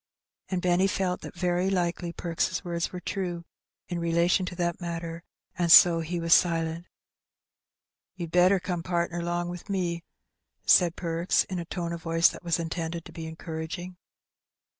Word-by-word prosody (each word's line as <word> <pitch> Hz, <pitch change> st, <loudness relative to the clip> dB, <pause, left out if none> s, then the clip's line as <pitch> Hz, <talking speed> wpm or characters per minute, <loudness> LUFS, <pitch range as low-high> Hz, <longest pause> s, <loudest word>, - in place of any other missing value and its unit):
And 185 Hz, -2 st, -2 dB
Benny 180 Hz, +1 st, +3 dB
felt 185 Hz, -1 st, -1 dB
that -, -, -9 dB
very 180 Hz, +1 st, 0 dB
likely 175 Hz, -2 st, -1 dB
Perks' 170 Hz, 0 st, -2 dB
words 170 Hz, -1 st, -2 dB
were 180 Hz, -, -6 dB
true 175 Hz, -2 st, -4 dB, 0.4 s
in 175 Hz, -2 st, -3 dB
relation 170 Hz, +2 st, +2 dB
to 180 Hz, -, -6 dB
that 175 Hz, 0 st, -2 dB
matter, 170 Hz, -1 st, -5 dB, 0.4 s
and 170 Hz, -1 st, +2 dB
so 170 Hz, -1 st, +9 dB
he 170 Hz, +2 st, -3 dB
was 165 Hz, 0 st, +3 dB
silent. 165 Hz, -1 st, +2 dB, 1.3 s
''You'd 170 Hz, -3 st, -5 dB
better 180 Hz, +2 st, +5 dB
come 180 Hz, -1 st, -3 dB
partner 170 Hz, 0 st, -1 dB
'long 175 Hz, 0 st, -2 dB
wi' 175 Hz, 0 st, -6 dB
me," 175 Hz, -4 st, -1 dB, 0.6 s
said 175 Hz, -1 st, +5 dB
Perks, 170 Hz, 0 st, +1 dB
in 185 Hz, -2 st, -5 dB
a 170 Hz, -, -5 dB
tone 170 Hz, 0 st, -4 dB
of 170 Hz, -, -6 dB
voice 165 Hz, 0 st, +4 dB
that -, -, -10 dB
was 170 Hz, -2 st, +1 dB
intended 165 Hz, 0 st, -4 dB
to -, -, -11 dB
be 160 Hz, -1 st, -6 dB
encouraging. 160 Hz, +2 st, -6 dB
170 Hz, 160 wpm, -27 LUFS, 170-180 Hz, 1.3 s, so